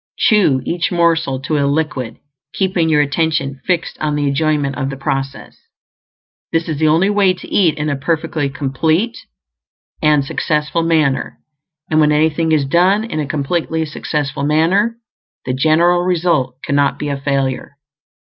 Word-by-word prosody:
Chew 170 - +3
each 170 0 -1
morsel 165 -6 +1
to 150 +2 -1
a 140 - +1
liquid, 140 -5 -2 0.4
keeping 185 -4 +1
your 150 -2 +4
attention 145 -2 -1
fixed 175 -2 -1
on 150 -1 -1
the 145 -1 0
enjoyment 145 -1 0
of 135 -1 -2
the 135 - -6
process. 135 0 -4 1.0
This 165 0 0
is 155 -3 -3
the 155 - +3
only 170 +6 +3
way 200 -3 +3
to - - -12
eat 165 -6 +2
in 150 0 -2
a 145 - 0
perfectly 155 0 -1
complete 155 - -1 0.9
and 150 -2 +3
successful 150 +3 -1
manner; 155 -5 0 0.5
and 155 - +3
when 150 -1 +4
anything 160 +2 +1
is 150 -3 +2
done 180 +8 +3
in 225 -9 -4
a 150 - -2
completely 160 +3 -1
successful 145 -1 -3
manner, 170 +10 +2 0.5
the 125 - -1
general 160 +6 +3
result 170 -8 0
cannot 140 -1 +1
be 150 - -4
a 140 - -2
failure. 135 0 -2
155 Hz, 155 wpm, -17 LUFS, 140-170 Hz, 1.0 s, your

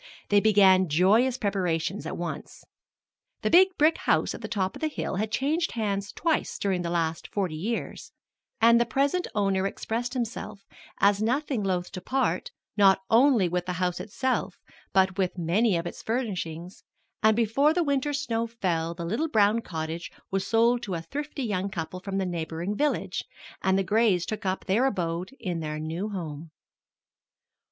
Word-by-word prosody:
They 205 - +5
began 190 -4 +5
joyous 215 - +3
preparations 190 -4 -1
at - - -5
once. 175 0 -6 0.8
The - - +1
big 370 +3 +8
brick 310 +2 +3
house - - +1
at - - -8
the - - -5
top 190 -3 -1
of - - -10
the 315 - +1
hill 290 -10 -3
had 215 +2 -2
changed 315 +8 0
hands 200 -3 -2
twice 325 -1 -1
during 190 -3 0
the 170 - -3
last 165 -2 -1
forty 190 -5 -2
years, 220 +9 -4 0.5
and 235 +1 +6
the - - +3
present 280 +9 +1
owner 195 -2 +1
expressed 240 +5 -3
himself 215 -4 -4 0.3
as 200 +1 +4
nothing 255 +2 0
loath 180 -2 -1
to 185 - -6
part, 270 - -1 0.3
not 195 -2 +5
only 235 -4 +5
with 180 +1 -2
the 180 - -1
house 180 0 -1
itself, 260 +5 -2 0.3
but 190 0 +2
with 185 -1 0
many 180 +4 +2
of 170 - -3
its 175 - -6
furnishings; 185 -7 -4 0.4
and 220 0 +5
before 235 +6 +3
the 345 +2 +1
winter 285 -1 0
snow 235 -6 -1
fell 170 -7 -2
the 170 -1 -5
little 235 - -1
brown 215 -2 +3
cottage 160 -2 -5 0.2
was 195 0 -1
sold 235 +2 +3
to 195 -6 -4
a 165 - -4
thrifty 290 - -5
young 200 -4 -1
couple 180 0 -5
from 195 +1 -4
the 195 - 0
neighboring 170 +2 -3
village, 295 +5 -1 0.4
and 190 0 +2
the 195 - +2
Grays 200 -3 +2
took 215 0 -4
up 185 0 -2
their 225 +8 +2
abode 175 -5 -2
in 180 -5 -3
their 155 -1 -4
new 165 +7 -3
home. 165 -5 -6
200 Hz, 175 wpm, -27 LUFS, 180-235 Hz, 0.8 s, big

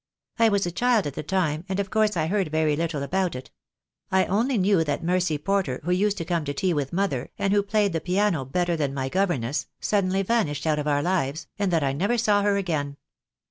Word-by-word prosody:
"I 230 -1 +5
was 200 -2 +1
a 175 - -2
child 235 +2 +2
at 145 - -3
the - - -4
time, 160 -2 -1
and 190 +1 -1
of 200 -1 -2
course 215 -3 +2
I 155 - +1
heard 195 +1 0
very 155 -1 +1
little 160 -2 -2
about 185 +2 -1
it. 125 - -8 0.6
I 190 0 +3
only 235 +6 +1
knew 190 -3 +3
that 145 -1 -2
Mercy 180 -2 +1
Porter 180 -4 -1
who 175 - -1
used 200 +3 +1
to 165 - -4
come 170 -1 -1
to 145 0 -3
tea 185 +4 +1
with 145 -3 -2
mother, 175 -9 -1
and 195 0 +1
who 205 - +4
played 200 -1 +1
the 165 - -1
piano 180 -3 +1
better 175 +6 0
than 145 -4 -2
my 135 -1 -2
governess, 150 -8 -1
suddenly 195 -1 +1
vanished 185 -10 0
out 155 -1 +1
of 150 - -3
our 145 -1 +1
lives, 160 -4 -1
and 200 -2 +1
that 165 -2 +2
T 135 -1 0
never 200 - 0
saw 210 -3 +3
her 200 0 +2
again. 150 -7 -2
180 Hz, 230 wpm, -25 LUFS, 150-200 Hz, 0.6 s, I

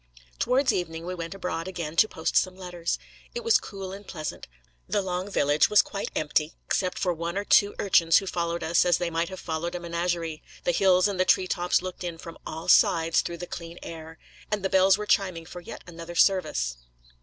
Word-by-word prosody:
Towards 255 +3 +2
evening, 165 -2 -3
we 180 - -3
went 170 +1 -6
abroad 180 -2 -4
again 170 -4 -5
to 215 - +6
post 160 -6 -3
some 185 -1 +2
letters. 180 -2 -3 0.4
It 480 - -3
was 460 -2 +5
cool 195 -2 -7
and 200 +1 -10
pleasant; 155 -4 -6 0.4
the 205 - +1
long 185 +1 -3
village 145 -6 +3
was 210 - +6
quite 200 - -5
empty, 155 +1 0
except 185 -1 -1
for 180 -2 0
one 170 +2 -4
or 200 - -2
two 205 0 +4
urchins 170 -4 +4
who 195 - 0
followed 170 -2 -2
us 165 +2 +3
as 175 -2 +3
they 175 -1 -2
might 165 +1 -1
have 190 -1 -8
followed 165 +1 -3
a - - -3
menagerie; 170 -2 -2 0.2
the - - +2
hills 185 +1 +4
and 200 -2 -3
the - - +5
tree 185 - +3
tops 180 -1 +1
looked 185 0 -6
in 170 -2 -4
from 165 0 -10
all 160 +1 -6
sides 165 -2 +4
through 170 - -5
the 175 - -6
clear 170 -1 -8
air; 160 -1 -9 0.3
and 205 -2 -1
the - - +1
bells 190 +1 +5
were 210 - -4
chiming 185 -6 +1
for 175 - -9
yet - - -9
another 170 0 -9
service. 60 - +2
175 Hz, 210 wpm, -26 LUFS, 165-190 Hz, 0.4 s, to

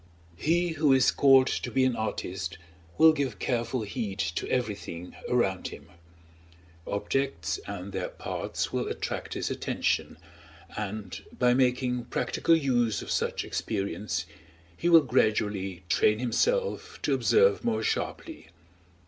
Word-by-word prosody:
He 175 - +1
who 155 -3 +3
is 130 -1 +5
called 135 -2 +6
to 125 - -2
be 130 +2 +2
an 130 -2 +1
artist 95 -5 -4 0.4
will 160 0 +7
give 135 -8 -2
careful 120 +2 -1
heed 105 -2 -4
to 85 -3 -2
everything 100 -8 -3
around 95 -7 +1
him; - - -11 1.0
objects 100 - -1
and 100 -1 -6
their 95 -1 -3
parts - - -4
will - - -1
attract - - -4
his - - -2
attention, - - -1 0.6
and 105 -2 -5
by 125 -1 +4
making 125 -1 +1
practical 165 - +1
use 120 -8 +1
of - - -6
such - - -1
experience 105 0 -3 0.5
he 170 - 0
will 165 -1 +8
gradually 105 -7 0
train 105 +4 +3
himself 475 - 0
to 145 - +2
observe 100 -5 +3
more 110 -1 0
sharply. - - -3
115 Hz, 130 wpm, -28 LUFS, 100-135 Hz, 1.0 s, will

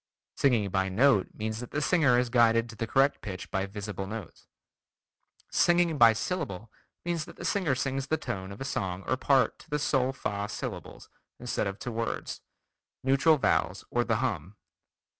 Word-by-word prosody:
Singing 115 -8 +2
by 95 0 +1
note 110 0 +4
means 110 +1 -3
that 125 - -7
the 150 - -2
singer 145 -4 +3
is 125 -1 0
guided 115 -1 +4
to 110 - -9
the 115 +1 -3
correct 135 +4 +2
pitch 95 -3 -7
by 95 -1 -1
visible 100 -1 -5
notes. 110 -4 -8 1.0
Singing 175 -3 +3
by 115 -1 +9
syllable 115 - -4 0.3
means 170 -3 -1
that - - -12
the 175 - -8
singer 170 -7 +1
sings 135 +1 -2
the 160 - +1
tones 95 -9 -5
of 100 - -9
a 135 - -4
song 95 -8 -3
or - - +2
part 135 0 +2
to - - -17
the 150 - 0
sol 135 -3 +1
fa 105 -6 -3
syllables - - -6 0.3
instead 120 -3 -2
of 100 0 -4
to 120 - -5
words, 115 0 -3 0.6
neutral 135 +4 +4
vowels - - 0
or 120 - +2
the 115 -2 0
hum. 105 - -2
120 Hz, 180 wpm, -29 LUFS, 105-140 Hz, 1.0 s, by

